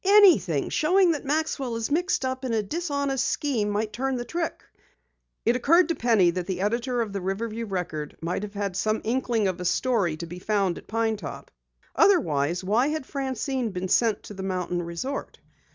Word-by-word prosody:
"Anything 375 - +5
showing 360 +3 +4
that 300 -3 -3
Maxwell 280 -4 -1
is 230 +3 -3
mixed 335 -3 +1
up 260 0 -3
in 250 -3 -1
a 220 -1 +1
dishonest 280 - -1
scheme 240 -8 0
might 210 +1 -1
turn 265 +1 -1
the 240 -1 -3
trick!" 335 +3 -3 0.8
It 235 - +4
occurred 335 +8 +4
to 335 - +1
Penny 225 -9 +3
that 180 0 -4
the 185 -2 -2
editor 240 +4 0
of 210 -3 -7
the 200 - -3
Riverview 220 +4 -3
Record 165 -6 -4
might 170 +3 -2
have 210 0 -7
had 200 -2 -2
some 215 +3 0
inkling 230 -3 +1
of 185 -1 -3
a - - -4
story 195 -7 +1
to 170 - -5
be 175 +2 -8
found 195 -3 0
at - - -18
Pine 225 0 0
Top. - - -8 0.4
Otherwise, 175 - +3
why 220 +8 +2
had 305 -2 -2
Francine 265 -2 -2
been 185 -1 -4
sent 225 0 +2
to - - -9
the 190 - -7
mountain 180 -2 -2
resort? 170 +12 -5
225 Hz, 190 wpm, -26 LUFS, 190-270 Hz, 0.8 s, Anything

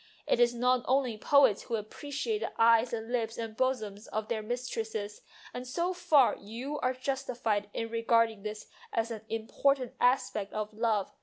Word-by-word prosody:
It - - +2
is 240 0 +4
not 250 +1 +2
only 260 -3 +2
poets 260 -1 +4
who 235 - -3
appreciate 290 - -3
the - - -3
eyes 230 +1 +5
and 225 0 -4
lips 230 -2 -1
and 225 -1 -5
bosoms 220 -5 -1
of 215 0 -4
their 225 -2 -1
mistresses, 220 -3 -4 0.3
and 250 +1 -6
so 345 +8 -1
far 300 -7 +4
you 245 +8 -6
are 255 0 +1
justified 250 -6 -2
in 225 +2 -3
regarding 230 -2 +2
this 210 +1 -6 0.3
as 225 +1 -1
an 220 -2 -5
important 250 +4 0
aspect 230 -5 +1
of 215 0 -3
love. 215 -3 0
230 Hz, 165 wpm, -30 LUFS, 220-255 Hz, 0.3 s, eyes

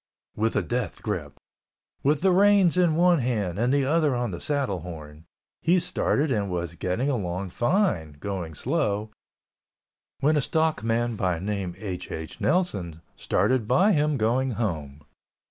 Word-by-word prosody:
With 110 +1 0
a 100 - +2
death 80 - -3
grip, - - -4 0.6
with 145 +1 +2
the 190 +1 +4
reins 195 -2 +5
in 175 -3 +3
one 175 0 +4
hand 105 -8 -1
and 120 +2 +2
the 140 -1 +2
other 150 -1 +2
on 120 -3 -1
the 85 - -6
saddle 140 -10 0
horn, 80 -2 -10 0.4
he 175 +2 +3
started 150 -3 0
and 105 -5 0
was 85 -2 -3
getting 90 +9 -2
along 95 -8 -2
fine—going 95 - -1
slow—when 105 - -4
a - - +3
stock 160 0 0
man 115 +1 0
by 90 -4 0
name 95 -1 -3
H. 95 -4 -6
H. 80 0 -7
Nelson 100 - 0
started 110 +4 +1
by 185 - +4
him 150 -4 +2
going 125 +3 +1
home. 75 -10 -3
115 Hz, 145 wpm, -26 LUFS, 90-150 Hz, 0.6 s, reins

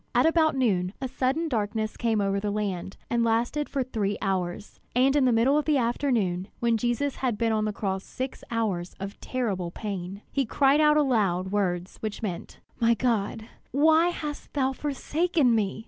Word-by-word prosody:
At - - +5
about 320 -2 +3
noon, 195 -8 +1
a 265 - -2
sudden 265 +5 0
darkness 215 -4 -1
came 225 -3 +1
over 195 0 +1
the 205 +1 -2
land, 200 -3 -3
and 235 0 +1
lasted 235 +6 0
for 275 -2 0
three 210 -5 -2
hours. 190 0 -3 0.2
And 265 +3 +4
in 285 -3 +4
the 250 - +4
middle 250 +6 +4
of 300 - -3
the 305 -2 +3
afternoon, 230 -7 0
when 235 -1 +2
Jesus 240 +5 -1
had 245 -5 -1
been 230 +1 +1
on 215 -1 +1
the 215 - 0
cross 195 -2 -3
six 260 +1 -6
hours 200 -7 -2
of 195 +1 -6
terrible 205 -9 -2
pain, 195 0 -6
he 275 - +1
cried 275 +4 +3
out 300 0 +5
aloud 200 -10 +1
words 185 -3 -1
which 215 0 -5
meant: 185 -5 -5 0.2
"My 230 0 +4
God, 225 -3 0
my - - -11
God, - - -21 0.2
why 315 +4 +5
hast 300 -4 -5
thou 270 -2 +1
forsaken 295 0 +1
me!" 210 -2 0
230 Hz, 190 wpm, -27 LUFS, 200-270 Hz, 0.2 s, At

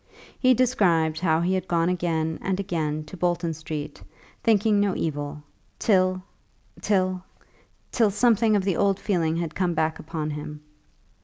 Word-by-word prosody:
He 255 -1 +4
described 175 -11 +2
how 165 -2 +2
he 180 +2 +1
had 185 0 -2
gone 170 -1 +1
again 165 -3 -1
and 190 0 -1
again 155 -6 -2
to 150 +4 -11
Bolton 175 -2 -1
Street, 155 -2 -6 0.4
thinking 215 -1 +3
no 200 -2 +1
evil, 145 -1 -4 0.3
till 185 -3 +2 0.6
till 185 -2 +1 0.7
till 225 -4 +3
something 220 +1 +3
of 200 - +1
the 190 -3 0
old 200 -1 +2
feeling 170 -6 0
had 165 -2 -3
come 180 -2 -1
back 160 0 0
upon 155 -1 -4
him. 150 0 -7
175 Hz, 150 wpm, -25 LUFS, 160-195 Hz, 0.7 s, He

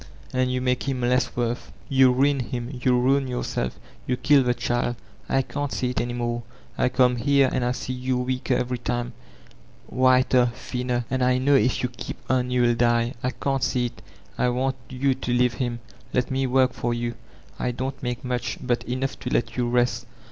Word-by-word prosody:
And 130 0 +1
you 125 0 -1
make 125 +1 0
him 130 -2 -2
less 125 +1 +1
worth. 120 0 -2 0.2
Yoa 130 -2 +5
ruin 140 +1 +3
him, 120 0 -4
you 125 -1 +3
ruin 135 +2 +2
yourself, 125 - -3 0.3
you 125 - 0
kill 145 0 +5
the 125 -1 +1
child. 120 0 -1 0.3
I 135 0 +2
can't 145 +1 -4
see 125 -1 -1
it 125 - -1
any 120 0 -3
more. 120 -1 -2 0.3
I - - +2
come 125 -1 +3
here, 140 +1 +3
and 130 - 0
I 125 0 +1
see 130 0 -4
you 130 0 -1
weaker 130 +1 0
every 125 0 -1
time, 120 0 -2 0.7
whiter, 130 -1 +4
thinner. 125 -1 -2
And 130 -1 +1
I 125 0 +3
know 135 +3 +3
if 130 -2 +3
you 125 - +1
keep 120 -1 -7
on 125 -1 +1
you'll 125 -1 +3
die. 120 0 +2
I 125 - 0
can't 135 +1 -2
see 125 -1 +1
it 120 -2 -7 0.4
I 125 - +3
want 130 +2 0
jroo 130 +1 +1
to 120 - -1
ksuve 125 +1 +2
Um; 120 -1 -5 0.3
let 125 0 0
me 130 0 +1
work 130 0 +3
for 120 0 -1
you. 120 0 -2 0.5
I - - 0
don't 130 +2 -4
make 125 0 -3
modi, 125 -1 -2
but 120 -1 0
eooqgh 130 +2 -2
to 125 - -4
let 115 -2 0
you 120 -1 0
rest. 120 0 +1
125 Hz, 200 wpm, -25 LUFS, 120-130 Hz, 0.7 s, Yoa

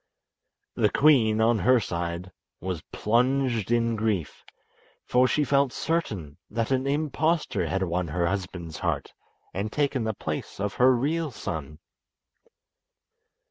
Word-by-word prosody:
The - - +2
queen, 120 -8 +4
on 115 0 +3
her 125 +3 +5
side, 85 -1 -4 0.3
was 90 -3 -4
plunged 120 -1 +1
in 115 -1 +2
grief, 105 -8 -2 0.6
for 125 +1 +4
she 150 - +2
felt 140 -1 +2
certain 105 - -2
that 115 +2 -2
an 130 +1 +1
impostor 155 +3 0
had 95 0 0
won 90 0 -1
her 85 +3 0
husband's 90 -3 -4
heart - - -2 0.4
and 100 +4 -3
taken 140 -4 0
the 110 -1 -2
place 75 +1 -5
of 100 0 -1
her 130 +1 +5
real 155 +6 0
son. 75 - -6
115 Hz, 130 wpm, -26 LUFS, 90-135 Hz, 0.6 s, her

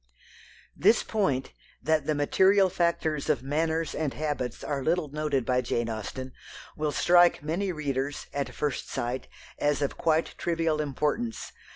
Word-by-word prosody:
This 215 +5 +4
point 140 - -1 0.3
that 160 -1 +1
the 155 - +2
material 190 +6 +4
factors 165 -4 0
of 125 - +1
manners 160 +3 0
and 150 -4 -2
habits 140 -6 -3
are 140 -2 -2
little 165 0 +1
noted 145 -3 -1
by 125 +1 +2
Jane 120 -1 -1
Austen 115 +4 -5 0.4
will 150 -1 -1
strike 175 0 +4
many 180 +6 -1
readers, 145 -3 -3
at 140 -1 -2
first 145 -3 -2
sight, 125 +2 -3 0.3
as 145 -1 +2
of 140 -2 -2
quite 160 -1 +1
trivial 165 -2 0
importance. 150 - -2
150 Hz, 145 wpm, -28 LUFS, 135-165 Hz, 0.4 s, This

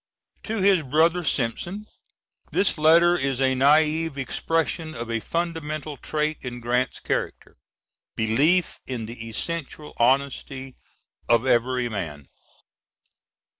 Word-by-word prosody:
[To 225 0 -4
his 195 -3 +5
brother 160 +5 +2
Simpson. 160 - -1 0.7
This 200 - +2
letter 170 +3 +6
is 135 -5 -1
a 130 -1 +3
naive 150 +3 +3
expression 160 +3 -1
of 120 -3 -5
a 115 - 0
fundamental 155 0 -3
trait 155 +2 -2
in 120 -1 -6
Grant's 125 +1 -1
character, - - -4 0.6
belief 145 +11 +2
in 120 -4 -4
the 115 0 -8
essential 150 +4 -4
honesty 135 +1 0 0.5
of 120 +1 +4
every 125 0 +2
man. 80 - -6
140 Hz, 110 wpm, -24 LUFS, 120-165 Hz, 0.7 s, letter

